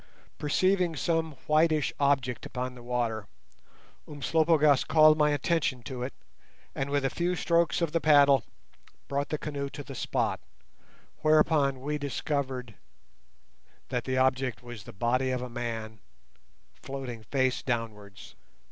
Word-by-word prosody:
Perceiving 180 Hz, +3 st, +1 dB
some 160 Hz, +1 st, 0 dB
whitish 155 Hz, -1 st, +2 dB
object 135 Hz, -4 st, +1 dB
upon 125 Hz, 0 st, -4 dB
the 125 Hz, -, -12 dB
water, 120 Hz, -4 st, -2 dB, 0.8 s
Umslopogaas 155 Hz, -1 st, +3 dB
called 155 Hz, -1 st, +6 dB
my 150 Hz, -1 st, +3 dB
attention 145 Hz, -3 st, 0 dB
to 130 Hz, -2 st, -6 dB
it, 125 Hz, +2 st, -3 dB, 0.6 s
and 135 Hz, +1 st, -3 dB
with 140 Hz, -1 st, 0 dB
a -, -, +2 dB
few 175 Hz, +3 st, -1 dB
strokes 170 Hz, -1 st, +1 dB
of 165 Hz, -, 0 dB
the 165 Hz, -, 0 dB
paddle 145 Hz, -3 st, +5 dB, 0.6 s
brought 140 Hz, +1 st, -2 dB
the 155 Hz, -, -1 dB
canoe 140 Hz, -2 st, -4 dB
to 145 Hz, -, -8 dB
the 135 Hz, -, -9 dB
spot, -, -, -1 dB, 0.8 s
whereupon 155 Hz, -3 st, +3 dB
we 150 Hz, +2 st, -2 dB
discovered 135 Hz, -4 st, -3 dB, 1.2 s
that -, -, -2 dB
the 130 Hz, 0 st, -1 dB
object 130 Hz, -3 st, +1 dB
was 120 Hz, -4 st, -9 dB
the -, -, -9 dB
body 125 Hz, +6 st, 0 dB
of 125 Hz, -1 st, -2 dB
a 125 Hz, -, -6 dB
man 115 Hz, -3 st, -5 dB, 0.8 s
floating 130 Hz, -4 st, -6 dB
face 130 Hz, +3 st, 0 dB
downwards. 105 Hz, -5 st, -5 dB
140 Hz, 135 wpm, -28 LUFS, 125-155 Hz, 1.2 s, called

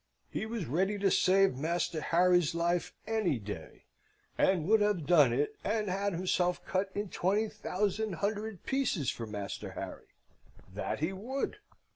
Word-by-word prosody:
He 220 Hz, -, -3 dB
was 225 Hz, -5 st, -3 dB
ready 190 Hz, -, 0 dB
to 195 Hz, -1 st, +2 dB
save 195 Hz, -4 st, +4 dB
Master 160 Hz, +2 st, -1 dB
Harry's 175 Hz, -1 st, +3 dB
life 170 Hz, 0 st, 0 dB
any 215 Hz, -, +1 dB
day, 100 Hz, -7 st, -8 dB, 0.5 s
and 185 Hz, -5 st, +2 dB
would 220 Hz, +1 st, +5 dB
have 205 Hz, -7 st, +1 dB
done 150 Hz, -8 st, +6 dB
it 140 Hz, +5 st, 0 dB
and 210 Hz, 0 st, 0 dB
had 200 Hz, +1 st, 0 dB
himself 180 Hz, 0 st, 0 dB
cut 190 Hz, +1 st, 0 dB
in 205 Hz, -1 st, -2 dB
twenty 205 Hz, +6 st, +1 dB
thousand 210 Hz, 0 st, -2 dB
hundred 205 Hz, +2 st, -3 dB
pieces 260 Hz, -, 0 dB
for 115 Hz, -, -6 dB
Master 105 Hz, -2 st, -5 dB
Harry, -, -, -7 dB, 0.7 s
that -, -, -3 dB
he 165 Hz, +5 st, 0 dB
would! 260 Hz, -, -3 dB
185 Hz, 150 wpm, -31 LUFS, 165-210 Hz, 0.7 s, done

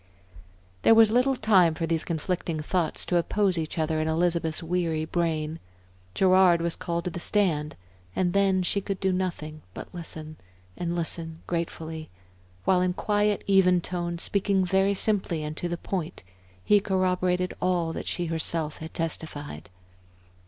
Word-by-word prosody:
There 225 Hz, -, +6 dB
was 225 Hz, -1 st, +6 dB
little 255 Hz, +3 st, +3 dB
time 190 Hz, -8 st, +4 dB
for 165 Hz, -, -2 dB
these 165 Hz, -1 st, -1 dB
conflicting 170 Hz, 0 st, -2 dB
thoughts 160 Hz, +1 st, -1 dB
to 175 Hz, -, +1 dB
oppose 190 Hz, +2 st, +1 dB
each 160 Hz, -1 st, -3 dB
other 155 Hz, 0 st, 0 dB
in 155 Hz, -, -1 dB
Elizabeth's 165 Hz, 0 st, 0 dB
weary 165 Hz, -2 st, -1 dB
brain. 160 Hz, -2 st, -1 dB, 0.6 s
Gerard 185 Hz, -2 st, +5 dB
was 170 Hz, 0 st, -1 dB
called 170 Hz, -1 st, -3 dB
to 180 Hz, -, -3 dB
the 175 Hz, -, -5 dB
stand, 170 Hz, -7 st, +1 dB, 0.4 s
and 175 Hz, -1 st, +1 dB
then 195 Hz, -2 st, +3 dB
she 200 Hz, +3 st, 0 dB
could 195 Hz, 0 st, -4 dB
do 190 Hz, -1 st, +1 dB
nothing 165 Hz, -5 st, -3 dB
but -, -, -9 dB
listen 155 Hz, -3 st, -7 dB, 0.4 s
and 175 Hz, -1 st, -3 dB
listen 165 Hz, -1 st, -3 dB
gratefully 160 Hz, -2 st, -4 dB, 0.6 s
while 185 Hz, -1 st, +4 dB
in 180 Hz, 0 st, +1 dB
quiet, 205 Hz, +1 st, 0 dB
even 185 Hz, -2 st, +4 dB
tones, 170 Hz, -1 st, -3 dB
speaking 195 Hz, -1 st, +1 dB
very 195 Hz, +2 st, +2 dB
simply 190 Hz, -6 st, +1 dB
and 150 Hz, 0 st, -5 dB
to 175 Hz, -, -3 dB
the 175 Hz, -, -2 dB
point, 170 Hz, -, -4 dB, 0.4 s
he 210 Hz, -, +5 dB
corroborated 185 Hz, -2 st, 0 dB
all 175 Hz, -3 st, +1 dB
that -, -, -6 dB
she 175 Hz, -, -1 dB
herself 160 Hz, -1 st, -1 dB
had 160 Hz, +1 st, -9 dB
testified. 150 Hz, -, -4 dB
175 Hz, 155 wpm, -26 LUFS, 160-185 Hz, 0.6 s, There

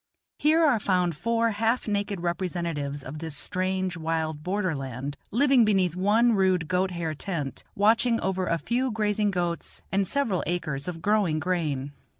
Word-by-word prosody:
Here 320 Hz, +2 st, +4 dB
are 265 Hz, -7 st, +3 dB
found 180 Hz, -4 st, +1 dB
four 230 Hz, +6 st, +1 dB
half 225 Hz, +4 st, 0 dB
naked 205 Hz, -2 st, -1 dB
representatives 170 Hz, -5 st, -2 dB
of 145 Hz, +4 st, -7 dB
this 160 Hz, -2 st, -3 dB
strange, 185 Hz, +1 st, -1 dB
wild 160 Hz, -1 st, -2 dB
border 185 Hz, +1 st, -1 dB
land, 135 Hz, 0 st, -5 dB
living 265 Hz, +1 st, +4 dB
beneath 190 Hz, -5 st, +2 dB
one 215 Hz, +6 st, +3 dB
rude 185 Hz, -5 st, +2 dB
goat 185 Hz, +2 st, +1 dB
hair 170 Hz, -3 st, -3 dB
tent, 150 Hz, -4 st, -4 dB
watching 230 Hz, +3 st, +3 dB
over 190 Hz, -1 st, -1 dB
a 170 Hz, -, +1 dB
few 250 Hz, +8 st, -1 dB
grazing 210 Hz, -2 st, +1 dB
goats 175 Hz, -3 st, -3 dB
and 195 Hz, 0 st, +1 dB
several 235 Hz, -9 st, 0 dB
acres 150 Hz, -5 st, -2 dB
of 165 Hz, -2 st, -5 dB
growing 205 Hz, -7 st, +2 dB
grain. 155 Hz, -6 st, -1 dB
185 Hz, 155 wpm, -26 LUFS, 165-210 Hz, -, Here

